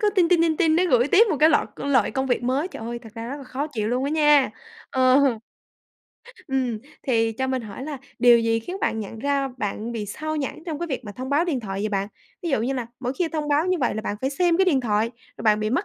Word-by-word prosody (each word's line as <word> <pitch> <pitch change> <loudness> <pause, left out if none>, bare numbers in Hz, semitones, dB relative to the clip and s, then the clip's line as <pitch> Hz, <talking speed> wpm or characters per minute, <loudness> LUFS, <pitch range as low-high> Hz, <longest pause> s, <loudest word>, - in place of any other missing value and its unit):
cứ 420 -1 +3
ting, 350 -4 +4
ting, 345 -2 +4
ting, 320 -2 +2
ting, 325 -3 +3
nó 360 - +3
gửi 245 +1 +4
tiếp 425 +7 +6
một 315 - +1
cái 310 - +7
loại 300 - +3
cơ - - -6
loại 260 -7 +3
công 265 +3 -1
việc 245 -1 0
mới. 270 +8 0
Trời 225 - -9
ơi, 235 +1 -4
thật 220 -2 -12
ra 230 +1 -6
rất 280 - -4
là 280 - -10
khó 265 +3 -3
chịu 220 -8 -3
luôn 250 +3 0
á 285 - -1
nha! 295 -3 +4 0.4
Ờ. 260 0 +4 1.3
Ừm, 255 -4 -1 0.2
thì 225 -3 +1
cho 260 +4 -2
mình 260 -2 -1
hỏi 210 +4 -8
là 290 -2 -5 0.2
điều 240 -1 +7
gì 230 0 +1
khiến 360 +11 -6
bạn 225 - 0
nhận 220 +1 -7
ra 280 +1 0
bạn 215 +2 -3
bị 215 -3 -4
xao 310 +9 -4
nhãng 295 +2 -4
trong 310 -3 -3
cái 345 - -3
việc 265 -5 -4
mà 205 - -7
thông 255 +5 -6
báo 295 +4 +3
điện 295 -8 -1
thoại 195 -2 -4
vậy 215 - -1
bạn? 200 -1 -1 0.3
Ví 340 - -2
dụ 265 -6 +2
như 260 - 0
là 250 -3 -3
mỗi 250 0 -2
khi 335 +4 -1
thông 305 -2 -3
báo 295 +4 +2
như 365 -1 +1
vậy 245 - +1
là 215 - -2
bạn 205 - -3
phải 265 - -1
xem 340 +3 +2
cái 380 - +4
điện 305 -8 +3
thoại 220 -1 0 0.3
rồi - - -9
bạn 215 -1 +3
bị 215 +1 -1
mất 350 +11 +1
265 Hz, 285 wpm, -24 LUFS, 230-310 Hz, 1.3 s, cái